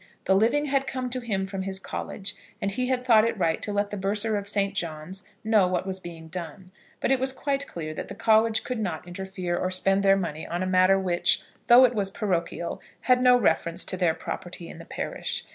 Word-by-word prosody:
The 190 - +4
living 235 +9 +3
had 275 -1 0
come 255 -2 -3
to 255 - -1
him 205 -6 -2
from 195 0 -5
his 190 0 -3
college, 195 +1 -5 0.3
and 200 - -1
he 250 +5 -1
had 255 -1 0
thought 225 -4 +6
it 230 0 0
right 165 -3 +1
to 210 - -3
let 205 0 -1
the 205 - -3
Bursar 205 +3 0
of 200 0 -2
Saint 200 -1 +1
John's 170 +1 -5 0.2
know 215 -4 +4
what 180 0 -1
was 190 -1 -3
being 165 -3 -9
done; 180 +1 -7 0.3
but - - 0
it 265 - +4
was 265 +1 +3
quite 275 +1 -2
clear 155 -2 -6
that - - -6
the - - -8
college 220 0 +3
could 250 -2 -3
not 180 -6 -3
interfere 185 -1 -4
or 185 - -1
spend 195 +1 +2
their 195 0 +5
money 165 -5 -4
on 175 +2 -2
a - - -1
matter 185 +1 +4
which, 180 -2 +1 0.2
though 245 +2 +9
it 250 - +1
was 200 -4 0
parochial, 180 -4 -2 0.2
had 250 -1 +3
no 250 -1 +6
reference 170 -5 +1
to - - -2
their 175 -3 +1
property 175 -1 -6
in - - -10
the - - -10
parish. - - -3
195 Hz, 230 wpm, -26 LUFS, 180-225 Hz, 0.3 s, though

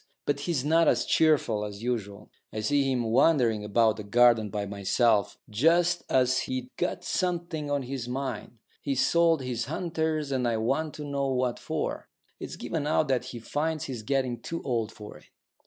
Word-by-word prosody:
But 145 -1 0
he's 145 -2 -1
not 165 +2 +4
as - - +3
cheerful 145 -9 +2
as 105 +1 -7
usual. 105 -4 -4 0.2
I 110 - -4
see 135 +4 +2
him 125 -2 0
wandering 120 -6 +3
about 110 +1 +2
the 105 - -6
garden 115 0 +4
by 105 +1 -3
himself, 100 +2 +1
just 170 +10 +3
as 130 -1 +3
if 130 - +2
he'd 130 -1 -4
got 180 - -2
something 170 -4 -2
on 145 -1 0
his 125 -2 -5
mind. 130 -2 -4 0.2
He's 135 -2 +1
sold 165 -4 +3
his 120 -2 -2
hunters, 160 -1 -2
and 130 -2 0
I 115 -1 +1
want 140 +8 -1
to 150 - -6
know 140 -1 -2
what 130 -2 0
for. - - -4 0.3
It's - - -6
given 155 -3 -3
out 155 -1 +2
that 125 -2 +1
he 125 -1 -7
finds 150 +6 -2
he's 125 -5 -5
getting 125 0 -1
too 165 +1 -5
old 115 -4 -1
for 105 -1 -11
it. - - -22
130 Hz, 185 wpm, -27 LUFS, 115-155 Hz, 0.3 s, not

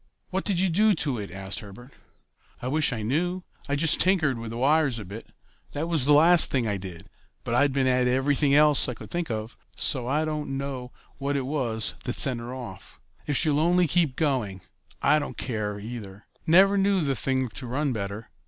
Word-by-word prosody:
"What 190 +1 -2
did 195 -4 0
you 190 - +2
do 210 +4 +3
to 140 -7 -1
it?" 100 - -6
asked 95 +1 -6
Herbert. 115 +6 -12 0.7
"I 125 - -5
wish 150 +2 +1
I 115 -3 -4
knew. 175 +10 -1 0.3
I 140 - +1
just 155 +2 +4
tinkered 160 -10 +2
with 115 -1 -6
the 115 - -6
wires 140 0 +2
a 105 - -7
bit. 105 +5 -9 0.5
That 150 +3 -3
was 160 -6 +1
the 145 - +5
last 165 +3 +6
thing 125 -4 0
I 100 -2 -1
did, 90 -3 -9 0.4
but 115 - -3
I'd 140 +3 +3
been 135 0 0
at 125 -1 +2
everything 140 +2 +2
else 150 -2 +4
I 125 - -4
could - - -12
think 175 -3 -2
of, 110 0 -5 0.2
so 125 -4 0
I 150 +4 0
don't 150 -3 -3
know 135 -2 -5 0.3
what 140 +1 -1
it 135 - -2
was 125 -6 -2
that 125 - -3
sent 130 -4 +5
her 120 +1 -7
off. 120 -8 -9 0.3
If 145 - 0
she'll 150 -3 +2
only 175 +3 +3
keep 165 -4 +1
going, 125 - -1 0.4
I 155 - +4
don't 145 - -6
care, 105 -4 -3
either. 105 -2 -9 0.2
Never 195 +4 +5
knew 195 -1 +2
the 140 -3 0
thing 130 0 -1
to 125 +3 -8
run 135 +2 -1
better. 105 0 -6
135 Hz, 210 wpm, -25 LUFS, 115-155 Hz, 0.7 s, last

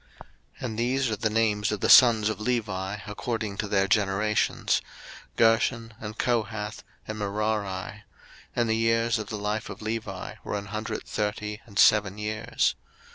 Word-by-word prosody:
02:006:016 - - -14 0.4
And 115 -2 -4
these 130 +2 +1
are - - +1
the 110 +2 -1
names 105 -2 +1
of 105 - -2
the - - +2
sons 115 -4 +7
of 110 - -3
Levi 105 -4 -2
according 110 -1 -3
to 105 - -1
their 100 -1 +2
generations; 105 +1 +1 0.5
Gershon, 115 0 +2
and 105 0 -7
Kohath, 110 -3 -1 0.2
and 110 0 -5
Merari: 105 0 -2 0.5
and 120 -1 +1
the 110 - +2
years 115 0 +2
of 105 - -5
the 110 - -4
life 105 +1 -2
of - - -8
Levi 110 -4 -4
were 105 - -3
an 100 - -6
hundred 110 0 -3
thirty 105 0 -3
and 100 -3 -10
seven 105 -2 +5
years. 110 +3 0
110 Hz, 160 wpm, -27 LUFS, 105-115 Hz, 0.5 s, sons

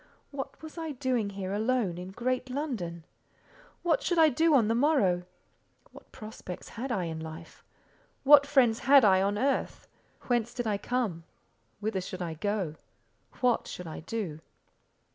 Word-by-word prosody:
What 275 +2 -7
was 315 +2 -8
I 320 -2 -4
doing 250 -5 -1
here 195 -1 -5
alone 215 -4 0
in 180 +1 -7
great 255 +5 -2
London? 230 - -4 0.8
What 345 +8 +2
should 350 -8 0
I 320 -1 +7
do 320 +3 +3
on 235 -6 +4
the 225 - +2
morrow? 230 - +2 0.7
What - - -16
prospects 215 -4 -9
had 250 +3 -5
I 195 -6 0
in 160 -1 -4
life? 160 +1 -9 0.6
What 285 0 +8
friends 245 -6 +4
had 275 -3 +6
I 190 -2 +5
on, 200 +1 +1
earth? 275 +4 -1 0.4
Whence 240 -1 0
did 245 -2 -2
I 205 -2 0
come? 215 -9 -2 0.6
Whither 205 -2 -1
should 185 0 -5
I 165 -2 -4
go? 185 -2 -2 0.6
What 245 -2 +2
should 180 - -7
I 160 - -7
do? 170 -3 -4
225 Hz, 160 wpm, -29 LUFS, 185-265 Hz, 0.8 s, What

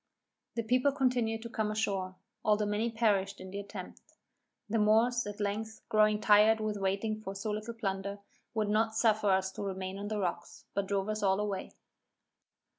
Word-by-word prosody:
The 230 - -1
people 250 +5 +3
continued 245 -5 +1
to 235 - -6
come 220 -2 -1
ashore, 195 -3 -1 0.3
though 210 0 +3
many 210 +3 0
perished 205 -4 +1
in 185 0 -9
the 200 - -4
attempt. 200 0 -8 0.7
The 220 +2 0
Moors, 225 +2 +3
at 205 0 -6
length, 215 +2 -3
growing 215 -1 +4
tired 215 +1 +6
with 215 -1 -2
waiting 200 +3 -1
for 195 -2 -6
so 205 +2 -3
little 215 +2 -4
plunder, 200 -2 -3 0.4
would 215 -2 +1
not 220 +1 +2
suffer 215 -2 +3
us 190 0 +2
to - - -7
remain 190 -1 -4
on 205 - -4
the 215 0 -2
rocks, 175 -3 -4
but 200 -1 -1
drove 195 0 0
us 215 0 -2
all 195 -1 +3
away. 205 -2 -3
210 Hz, 180 wpm, -31 LUFS, 195-220 Hz, 0.7 s, tired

